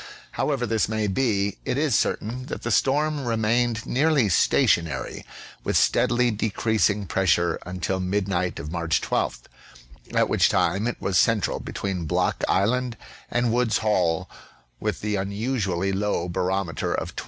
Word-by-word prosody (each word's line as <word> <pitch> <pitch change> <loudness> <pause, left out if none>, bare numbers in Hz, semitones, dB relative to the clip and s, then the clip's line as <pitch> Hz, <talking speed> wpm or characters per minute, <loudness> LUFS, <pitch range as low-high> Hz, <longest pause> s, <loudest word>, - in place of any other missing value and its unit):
However 135 -4 -1
this 110 -2 0
may 110 -1 -1
be, 100 -2 0
it 125 - -2
is 145 -3 +1
certain 125 +4 -1
that - - -6
the 120 - -2
storm 145 +5 +1
remained 115 0 0
nearly 140 -4 +2
station 85 0 +3
ary, - - -6 0.4
with - - +1
steadily 120 0 +3
decreasing 105 -1 0
pressure 85 -2 +1
until 90 +1 -2
midnight 95 -1 -1
of 75 +2 -6
March 85 -2 0
12th, - - -1 0.7
at - - +3
which - - +3
time 100 +4 +1
it 120 - -3
was 95 -2 +1
central 115 -4 +2
between 95 -4 -4
Block 90 +3 0
Island 120 +5 +1 0.3
and 120 -1 +1
Wood's 120 -2 +2
HoU, 90 -7 +1 0.5
with - - -3
an 105 -1 0
unusually 100 -2 -1
low 95 -3 -1
barometer 90 -1 -1
of - - -4
28. - - -4
105 Hz, 145 wpm, -24 LUFS, 95-120 Hz, 0.7 s, station